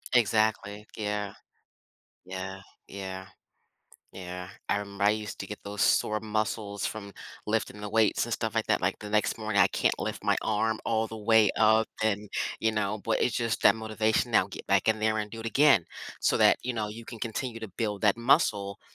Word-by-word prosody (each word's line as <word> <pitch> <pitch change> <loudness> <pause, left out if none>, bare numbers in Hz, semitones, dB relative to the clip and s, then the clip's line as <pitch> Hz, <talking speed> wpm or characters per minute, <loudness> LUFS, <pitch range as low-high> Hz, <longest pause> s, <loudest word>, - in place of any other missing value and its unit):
Exactly, 110 -2 +1
yeah. 105 -1 -3 0.9
Yeah, 95 +1 -6 0.3
yeah. 95 -1 -6 0.9
Yeah, 90 0 -7 0.2
I 100 - +2
remember 100 0 -4
I 105 - +6
used 105 -1 -4
to - - -5
get 105 - -8
those 100 0 -6
sore 105 0 +3
muscles 105 -1 -2
from 100 -2 -5 0.3
lifting 105 -1 -1
the 105 - -5
weights 110 -1 +2
and - - -5
stuff - - -2
like - - +1
that - - +2
like, - - 0
the 105 - -8
next 105 +1 +1
morning, 110 -3 +1
I 95 - +4
can't - - +1
lift - - -4
my - - +3
arm 110 +1 0
all 110 0 +1
the 110 - -8
way 110 -1 +4
up 110 +1 +4 0.2
and, 105 -1 0 0.3
you 110 0 +1
know, 105 0 -1
but 115 - +1
it's 125 - +1
just 115 -1 -1
that 100 - +6
motivation 110 0 0
now - - +4
get - - -9
back - - +2
in 110 0 +3
there 110 0 +1
and 105 -1 -3
do 115 - -8
it 115 - -6
again, 135 - +5 0.3
so - - +2
that, - - +6
you 125 - -1
know, 110 -2 -2
you 115 +2 -9
can 115 -2 -10
continue 115 0 -4
to 110 - -6
build 105 -2 -2
that 105 +1 +4
muscle 105 -6 +2
105 Hz, 200 wpm, -28 LUFS, 100-110 Hz, 0.9 s, I